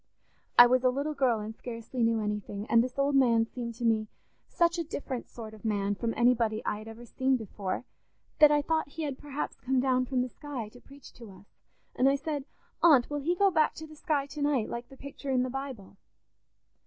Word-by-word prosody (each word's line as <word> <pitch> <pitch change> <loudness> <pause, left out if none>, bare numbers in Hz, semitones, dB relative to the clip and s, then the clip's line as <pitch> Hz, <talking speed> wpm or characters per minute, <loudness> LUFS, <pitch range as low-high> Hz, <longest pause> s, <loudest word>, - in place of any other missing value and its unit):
I 240 - +11
was 255 +1 +3
a 255 - +5
little 285 +4 -2
girl 255 -6 +2
and 215 +1 -6
scarcely 235 +1 -6
knew 230 -1 +2
anything, 210 -1 -4
and 230 0 +6
this 255 +1 -6
old 280 +1 +2
man 235 -4 +4
seemed 235 0 -6
to 235 - -4
me 220 -1 +2 0.4
such 340 0 +1
a - - 0
different 275 -5 -5
sort 220 -2 -9
of 215 - -14
a - - -2
man 205 -1 0
from 230 +3 -2
anybody 235 -2 +2
I 210 - -1
had 215 - -11
ever 225 +2 -10
seen 260 +3 +1
before 205 0 -5 0.5
that 300 -1 +9
I 295 0 +3
thought 320 0 0
he 320 +3 -6
had 280 -3 -4
perhaps 295 0 -5
come 260 0 0
down 255 -1 +1
from 255 -1 0
the 255 - -5
sky 260 -6 -7
to 245 +3 -16
preach 280 0 -15
to 230 -3 -12
us, 190 0 -15 0.5
and 265 - +4
I 275 - +3
said, 285 -1 -3 0.4
'Aunt, 290 -6 +5
will 290 - -1
he 335 +5 0
go 395 +1 +4
back 315 -3 +2
to 315 - -8
the 310 0 -13
sky 295 -3 -1
to 290 +1 -8
night, 285 -6 +1
like 235 0 -6
the 270 - -14
picture 280 0 -8
in 255 -1 +2
the 255 - -3
Bible? 260 -8 -7
255 Hz, 230 wpm, -29 LUFS, 230-285 Hz, 0.5 s, I